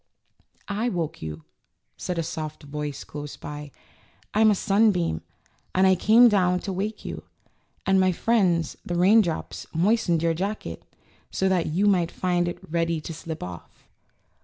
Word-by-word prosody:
woke 195 -7 -2
you," 80 0 -6 0.5
said 180 - -4
a 165 - 0
soft 155 -1 -5
voice 145 0 -5
close 145 0 -7
by. 150 0 -7 0.6
^^I'm 215 +1 +5
a 210 - +4
sunbeam 195 - +2 0.5
and 185 +1 +5
I 190 - +6
came 220 +6 +6
down 180 -4 +3
to 195 - -4
wake 210 +4 -4
you; - - -5 0.6
and 190 0 +4
my 185 0 +4
friends 180 -5 +1
the 175 - -3
raindrops 185 -1 +2
moistened 175 -2 +2
your 165 0 +2
jacket, 195 +6 -4 0.5
so 190 - 0
that 180 -3 +1
you 180 +7 +1
might 180 -5 +3
find 175 -1 0
it 175 - -3
ready 165 0 0
to 160 +2 -7
slip 160 0 -6
off." 90 -1 -10
175 Hz, 150 wpm, -25 LUFS, 160-200 Hz, 0.6 s, I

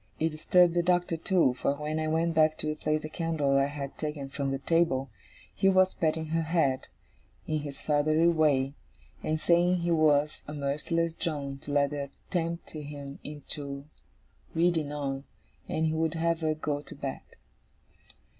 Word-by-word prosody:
It 160 - +2
disturbed 170 +3 +4
the 175 - +3
Doctor 175 -1 +2
too, 165 -5 +3
for 140 +2 0
when 150 +2 -3
I 155 - -1
went 165 +2 +1
back 155 -1 +4
to 155 - -2
replace 155 0 -1
the - - -3
candle 155 -4 0
I 135 - +3
had 140 -1 -6
taken 150 -3 -4
from 140 0 -2
the 135 - -1
table, 135 -4 +1 0.4
he 195 - +3
was 185 0 +4
patting 160 -1 -1
her 165 +1 +1
head, 160 -5 +1 0.6
in 155 -1 -1
his 145 -2 -7
fatherly 155 +2 +3
way, 145 -5 +3 0.5
and 155 0 -1
saying 175 +2 +3
he 170 0 0
was 150 -2 +3
a 150 - -6
merciless 150 +4 -1
drone 140 -5 -3
to 145 - -8
let 140 0 +3
her 140 -1 -4 0.2
tempt 170 -1 -2
him 145 -2 -7
into 140 -1 -6 0.7
reading 165 -3 +2
on; 140 -2 -3 0.4
and 160 - 0
he 160 - +1
would 160 0 0
have 165 0 +1
her 155 -1 0
go 145 -1 -2
to - - -10
bed. - - -4
155 Hz, 170 wpm, -29 LUFS, 145-165 Hz, 0.7 s, disturbed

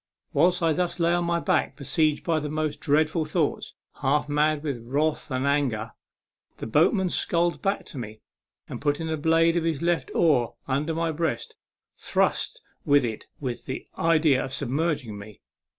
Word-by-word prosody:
Whilst 180 0 +3
I 165 -1 +3
thus 175 +1 -1
lay 170 0 +3
upon 175 0 +1
my 170 0 +1
back, - - 0
besieged 155 +2 0
by 165 -2 +1
the 150 0 -4
most 155 0 -2
dreadful 155 +2 +2
thoughts, 155 -1 -1 0.3
half 145 +2 +1
mad 150 0 +1
with 140 -5 -3
wrath 150 +5 -1
and 130 -1 -1
with 140 +1 +3
despair, 110 0 -5 0.6
the - - -6
boatman 175 - +2
sculled 170 0 +1
back 195 +1 -1
to 140 - -6
me, 110 -2 -7 0.5
and, - - -7
putting 145 +2 0
the 160 0 -1
blade 165 +2 +3
of 170 - +1
his 165 -2 -1
left 170 -6 0
oar 140 -9 +3
upon 140 +4 0
my 165 0 0
breast, 155 -6 -2 0.4
thrust - - 0 0.2
with 145 -2 +4
it 110 -2 -5
with 125 -4 -4
the 130 - -5
idea 155 -5 +3
of 130 - -6
submerging 140 -5 -2
me. 105 -1 -12
155 Hz, 175 wpm, -26 LUFS, 135-165 Hz, 0.6 s, with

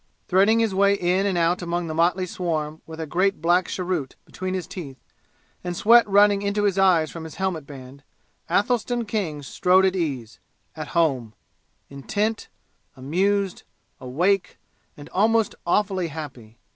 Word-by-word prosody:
Threading 200 +5 +4
his 225 -3 0
way 200 +1 +4
in 185 +1 +1
and 190 -3 0
out 170 +2 +1
among 175 0 -2
the 160 - -4
motley 175 +3 +2
swarm 160 -4 -3
with 160 0 -9
a 160 - -3
great 185 +6 0
black 175 +3 +2
cheroot 180 -7 -3
between 185 0 -5
his 185 -3 -3
teeth 145 -8 -8 0.7
and 175 -1 -4
sweat 235 0 +5
running 200 0 +5
into 200 +1 -1
his 200 -2 +1
eyes 175 -5 +3
from 165 - -8
his 160 -2 -9
helmet 180 -7 -3
band, 135 -1 -11 0.5
Athelstan 240 +5 0
King 185 -9 -3
strode 185 +7 +3
at 190 0 +1
ease 135 -10 -3 0.4
at 155 +2 -6
home 130 -10 +1 0.5
intent 205 +11 -3 0.5
amused 190 +8 0 0.4
awake 175 +10 0 0.4
and 145 - -11
almost 220 +2 +2
awfully 190 -1 +1
happy. 130 -8 -9
180 Hz, 150 wpm, -23 LUFS, 155-200 Hz, 0.7 s, sweat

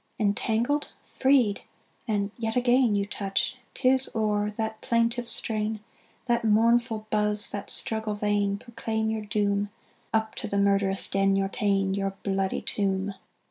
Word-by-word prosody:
Entangled! 225 +6 +1 0.3
freed! 260 -7 +3 0.5
and 205 -2 0
yet 225 -1 -2
again 245 -2 +3
You 200 0 +1
touch! 200 +4 -1 0.2
'tis 260 0 +3
o'er 210 -1 +1
that 220 +1 -4
plaintive 235 +1 +1
strain, 215 -1 -2 0.5
That 240 -1 +1
mournful 225 0 +3
buzz, 210 0 +2
that 200 -1 -5
struggle 220 -1 -1
vain, 205 -1 +1
Proclaim 220 0 -3
your 220 -1 -2
doom: 205 0 0 0.4
Up 220 0 0
to - - -2
the 200 - -2
murderous 200 -1 +2
den 195 0 +2
you're 195 0 +1
ta'en, 195 -1 +1
Your 195 0 -2
bloody 195 -1 -1
tomb! 195 -1 -1
210 Hz, 140 wpm, -27 LUFS, 200-225 Hz, 0.5 s, freed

